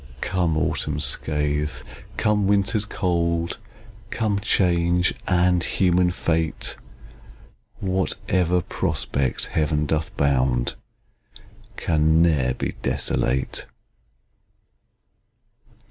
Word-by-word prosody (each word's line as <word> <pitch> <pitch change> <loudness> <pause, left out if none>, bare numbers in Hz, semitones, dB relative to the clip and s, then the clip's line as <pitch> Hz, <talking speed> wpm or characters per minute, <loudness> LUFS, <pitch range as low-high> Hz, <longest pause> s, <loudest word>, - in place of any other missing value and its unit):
Come 90 -4 0
autumn's - - 0
scathe, 75 -3 -1 0.3
come 105 -2 +2
winter's 100 +2 +2
cold, 85 -3 -1 0.5
Come 105 -3 0
change, 90 -3 +2
and 90 -1 +3
human 90 -1 +2
fate! 80 -2 -1 1.1
Whatever 95 -2 0
prospect 70 -2 -1
Heaven 75 -1 0
doth 80 +1 -2
bound, 65 -3 +1 1.0
Can 80 0 +2
ne'er 70 -7 +2
be - - -3
desolate. 65 +2 -1
85 Hz, 75 wpm, -23 LUFS, 75-90 Hz, 1.1 s, and